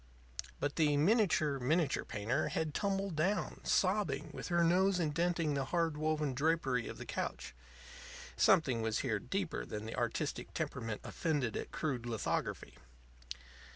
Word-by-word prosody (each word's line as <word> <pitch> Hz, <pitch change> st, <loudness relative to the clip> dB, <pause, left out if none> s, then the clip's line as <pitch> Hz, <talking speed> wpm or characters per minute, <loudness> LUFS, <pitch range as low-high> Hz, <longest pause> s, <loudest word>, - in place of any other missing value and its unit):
But 145 Hz, 0 st, -2 dB
the 150 Hz, -3 st, +3 dB
miniature 155 Hz, -, +3 dB
miniature 150 Hz, +3 st, +1 dB
painter 115 Hz, +8 st, -1 dB
had 160 Hz, -2 st, -2 dB
tumbled 195 Hz, -1 st, -1 dB
down, 185 Hz, +5 st, 0 dB
sobbing, 185 Hz, -7 st, +1 dB
with -, -, -6 dB
her 170 Hz, -1 st, +3 dB
nose 185 Hz, +2 st, +3 dB
indenting 165 Hz, 0 st, +1 dB
the 135 Hz, -1 st, -1 dB
hard 165 Hz, 0 st, 0 dB
woven 155 Hz, -2 st, 0 dB
drapery 135 Hz, -4 st, +1 dB
of -, -, -7 dB
the -, -, -7 dB
couch. -, -, -4 dB, 0.8 s
Something 135 Hz, -11 st, +4 dB
was 110 Hz, -1 st, 0 dB
here -, -, 0 dB
deeper -, -, -2 dB
than 105 Hz, -, -6 dB
the 110 Hz, -, -5 dB
artistic -, -, -2 dB
temperament 115 Hz, -4 st, -3 dB
offended 145 Hz, -9 st, -1 dB
at -, -, -4 dB
crude 130 Hz, -6 st, -2 dB
lithography. 115 Hz, -2 st, -2 dB
155 Hz, 140 wpm, -34 LUFS, 130-175 Hz, 0.8 s, Something